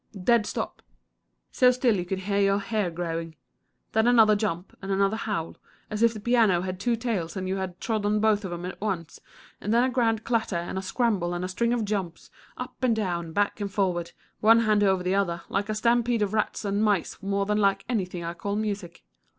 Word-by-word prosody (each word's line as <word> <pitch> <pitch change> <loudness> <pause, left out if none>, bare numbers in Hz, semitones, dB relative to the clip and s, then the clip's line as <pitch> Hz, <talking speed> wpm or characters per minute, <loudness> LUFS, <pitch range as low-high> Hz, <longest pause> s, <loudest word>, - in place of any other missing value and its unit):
Dead 220 +2 +3
stop - - -4 0.7
so 250 - +5
still 250 -2 +2
you 180 - -1
could 190 +1 -3
hear 200 +1 0
your 195 0 +3
hair 205 -2 -1
growing. 165 -1 -4 0.6
Then 220 +1 +2
another 225 -3 +6
jump, 195 -4 -3
and 195 0 -4
another 195 +2 +2
howl, 205 -7 -3 0.3
as 210 +1 -3
if 230 0 +5
the 220 - -7
piano 220 -5 +3
had 185 0 -4
two 235 +4 +1
tails 215 -7 -3
and 185 0 -3
you 190 +1 -1
had 185 -2 -5
trod 220 -3 -1
on 210 +1 +2
both 215 -1 +2
of 190 - -5
'em 175 0 -5
at 185 - -7
once, 175 -6 -3 0.4
and 210 - -2
then 235 +2 +4
a 260 - +1
grand 230 -3 +1
clatter 225 -5 0
and 175 +3 -3
scramble 190 -5 0
and 180 +1 -2
string 235 +5 0
of 240 -3 0
jumps, 195 -5 -4 0.3
up 250 - -7
and 250 -3 +3
down, 175 -6 -2
back 205 +4 0
and 200 -1 -3
forward, 180 -4 -1 0.3
one 225 +2 +6
hand 215 -2 +3
over 190 -2 +2
the 180 +1 0
other, 175 -4 0
like 200 +2 -1
a 215 - -1
stampede 235 0 +2
of 205 0 -2
rats 215 0 -1
and 200 +1 0
mice 205 -5 0
more 200 0 0
than 210 +1 +1
like 195 -1 +2
anything 185 -7 -2
I 170 0 -3
call 200 +4 -3
music. 205 - -4
200 Hz, 215 wpm, -26 LUFS, 185-220 Hz, 0.7 s, another